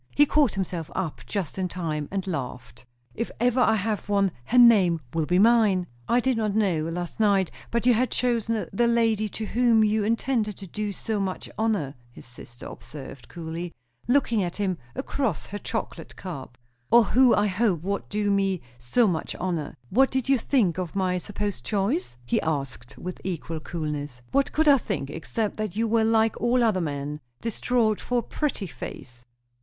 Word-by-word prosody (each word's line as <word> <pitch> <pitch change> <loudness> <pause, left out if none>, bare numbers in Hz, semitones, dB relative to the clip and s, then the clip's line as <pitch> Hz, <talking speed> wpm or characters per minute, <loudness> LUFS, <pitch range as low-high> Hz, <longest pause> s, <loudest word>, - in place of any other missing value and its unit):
He 290 - +7
caught 290 -5 +2
himself 180 -4 -3
up 175 -5 -3
just 190 -3 -3
in 185 - 0
time, 160 -5 -3
and 195 -1 -3
laughed. 130 -7 -6 0.3
"If 230 - -3
ever 245 +1 +2
I 220 -3 +4
have 210 0 -2
one, 200 -2 +3
her 250 - 0
name 205 -9 +7
will 160 -2 0
be 180 - +3
mine." 210 -3 +4 0.2
"I 240 - +4
did 255 -1 +1
not 215 -2 0
know, 185 -8 +2
last 175 +4 -5
night, 200 -5 +3 0.2
but 235 0 -1
you 250 - +6
had 245 +3 +2
chosen 230 -3 0
the 235 +4 +3
lady 225 -2 +2
to 220 - -5
whom 230 0 +3
you 215 0 +2
intended 225 -1 0
to 200 - -8
do 210 +3 -3
so 210 +2 -3
much 190 -2 -3
honour," 210 -11 0 0.2
his 120 - -13
sister 120 0 -12
observed 135 -5 -9
coolly, 170 0 -6 0.3
looking 245 -4 +3
at 175 -2 -2
him 190 -4 -1 0.2
across 240 - -2
her 205 - -6
chocolate - - -5
cup. 135 -9 -8 0.3
"Or 235 0 +7
who 250 +3 +5
I 205 - +3
hoped 190 -4 +1
would 200 +2 -3
do 205 -1 0
me 195 -2 +1 0.2
so 120 - +2
much 165 -4 -2
honour. 170 -5 -3 0.2
What 265 +6 +5
did 260 -1 -1
you 270 -2 +4
think 205 - +1
of 180 -2 -4
my 185 -2 +1
supposed 205 - -4
choice?" 205 - -1
he 120 - +1
asked 135 -5 -3
with 180 0 -7
equal 165 -3 -4
coolness. 150 -6 -5
"What 275 0 +2
could 315 0 +2
I 280 -2 +7
think, 165 -11 -3
except 205 +7 -3
that 215 -4 -3
you 225 +1 +1
were 225 0 +3
like 225 0 +2
all 240 +1 +3
other 210 -5 +2
men 145 -1 -3 0.2
distraught 230 -1 +1
for 245 - -1
a 240 - +1
pretty 290 -9 -2
face." 120 -7 -9
200 Hz, 185 wpm, -26 LUFS, 170-230 Hz, 0.3 s, He